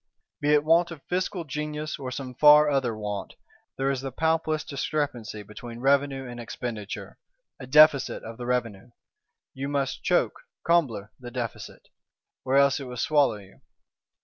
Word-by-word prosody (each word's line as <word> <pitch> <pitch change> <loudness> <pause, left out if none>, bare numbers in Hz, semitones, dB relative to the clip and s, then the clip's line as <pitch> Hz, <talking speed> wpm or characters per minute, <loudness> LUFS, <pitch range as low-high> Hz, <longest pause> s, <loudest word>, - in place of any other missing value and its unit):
Be 145 0 +2
it 150 -1 +4
"want 165 +2 +4
of 160 -5 -10
fiscal 180 0 -2
genius," 150 +1 -4
or 130 -2 -5
some 130 0 -6
far 150 +3 +7
other 125 -5 0
want, 105 -1 -5 0.4
there 135 +1 +1
is 135 -2 -2
the 135 0 -5
palpablest 160 +2 0
discrepancy 135 -7 -3
between 115 +3 -10
Revenue 135 0 +1
and 120 -1 -8
Expenditure; 115 -3 -6 0.4
a 130 - -9
Deficit 150 -1 +5
of 115 0 -8
the 120 - -5
Revenue: 120 -3 -2 0.6
you 135 +1 -4
must 140 -2 -1
"choke - - +1 0.3
(combler) 125 -12 +2
the 125 -1 -8
Deficit," 120 -2 -6 0.5
or 130 - 0
else 140 0 +4
it 135 - -6
will 125 0 -7
swallow 145 -3 +3
you! 100 -2 -16
135 Hz, 155 wpm, -26 LUFS, 120-150 Hz, 0.6 s, far